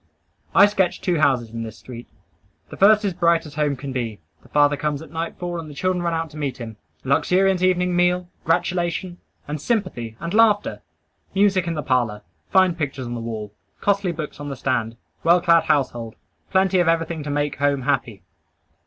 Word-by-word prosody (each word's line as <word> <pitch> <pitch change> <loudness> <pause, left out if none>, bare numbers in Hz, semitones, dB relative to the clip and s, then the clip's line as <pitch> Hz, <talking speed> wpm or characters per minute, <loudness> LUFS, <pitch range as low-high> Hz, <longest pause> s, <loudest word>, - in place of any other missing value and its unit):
I 200 - +9
sketch 195 -3 0
two 175 -4 0
houses 125 -6 +2
in 115 0 -5
this 110 -2 -7
street. 120 -1 -10 0.6
The - - -9
first 210 +2 +5
is 195 - 0
bright 170 -1 +2
as 150 - -10
home 150 -2 0
can 135 0 -6
be. 115 -5 -3 0.2
The - - -20
father 145 0 +4
comes 150 +1 -2
at 155 - -14
nightfall, 170 +1 -4
and 160 -2 -8
the 145 - -10
children 185 +3 0
run 170 -1 0
out 165 -1 -3
to 155 - -11
meet 140 -4 -3
him. 115 -3 -8 0.3
Luxuriant 180 +7 +2
evening 180 -1 +2
meal, 180 0 +2 0.2
gratulation, 175 +1 -1 0.3
and 150 0 -4
sympathy, 120 - -2
and 170 +3 -5
laughter. 215 -2 +3 0.5
Music 195 -3 +3
in 165 - -1
the 150 - -3
parlor. 120 -6 0 0.3
Fine 185 -2 +4
pictures 140 -4 -3
on 120 - -5
the 120 - -4
wall. 110 -3 -5 0.3
Costly 200 -2 +1
books 155 -3 -6
on 145 0 -5
the 140 - -4
stand. 120 -3 -1 0.3
Well 170 +2 +5
clad 170 -2 +4
household. 120 -7 0 0.3
Plenty 190 -1 +3
of 175 - +2
everything 165 -1 0
to 145 - -6
make 145 -1 -1
home 140 -1 +1
happy. 125 -7 -1
160 Hz, 190 wpm, -22 LUFS, 135-180 Hz, 0.6 s, I